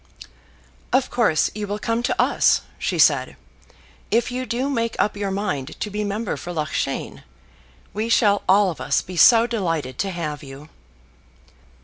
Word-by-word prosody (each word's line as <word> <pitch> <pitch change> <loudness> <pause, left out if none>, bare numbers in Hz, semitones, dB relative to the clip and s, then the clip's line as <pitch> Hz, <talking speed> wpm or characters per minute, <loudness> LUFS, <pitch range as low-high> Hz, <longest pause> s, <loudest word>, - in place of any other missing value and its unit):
"Of 260 0 +1
course 215 -11 +2
you 210 0 -5
will 205 +1 -3
come 230 +2 -1
to 240 - -2
us," - - +3 0.2
she - - -2
said, - - +3 0.7
"if 235 +2 +1
you 255 +1 -4
do 250 +3 -1
make 230 -5 -1
up 210 - +1
your 200 -1 -3
mind 190 -9 -3
to 210 - -4
be 210 +1 -2
member 205 +1 -3
for 175 - -7
Loughshane. 155 -4 -3 0.7
We 220 +2 -2
shall 205 -3 +3
all 195 0 +5
of 165 - -9
us 140 - +1
be 185 - -9
so 230 +6 +7
delighted 165 - -3
to 195 - 0
have 155 -5 -4
you!" 140 +2 -11
205 Hz, 160 wpm, -22 LUFS, 165-230 Hz, 0.7 s, so